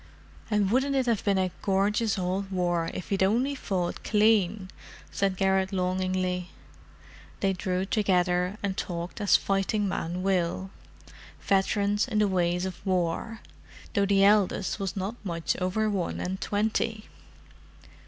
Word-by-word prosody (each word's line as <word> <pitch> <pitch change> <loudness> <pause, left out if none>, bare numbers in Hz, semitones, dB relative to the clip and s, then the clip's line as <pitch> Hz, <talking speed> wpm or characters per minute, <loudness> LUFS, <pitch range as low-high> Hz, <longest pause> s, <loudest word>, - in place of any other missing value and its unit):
"And 205 -2 +1
wouldn't 270 +3 +2
it 265 -1 +2
have 230 -4 0
been 200 -2 +2
a 185 -1 +1
gorgeous 205 +2 +1
old 190 +2 -2
war 175 -3 0
if 185 - -7
he'd 195 -1 0
only 235 +9 +2
fought 185 -9 -3
clean!" 210 -3 +2 0.4
said 195 -2 0
Garrett 190 0 +2
longingly. 185 -1 -1 0.9
They 195 -1 +1
drew 185 0 -2
together 180 -2 +1
and 195 -2 -1
talked 175 +2 -4
as 205 - +5
fighting 200 +1 0
men 180 -1 -3
will—veterans 195 +3 -1
in 225 -4 -2
the 210 -1 +4
ways 180 -1 0
of 185 -2 -6
war, 185 +4 -1 0.5
though 200 -3 +2
the 195 0 +4
eldest 205 0 +3
was 195 -2 -3
not 200 +5 -4
much 170 -4 -2
over 185 +4 0
one 195 -4 -2
and 190 +1 -3
twenty. 220 +1 -1
195 Hz, 135 wpm, -27 LUFS, 185-210 Hz, 0.9 s, as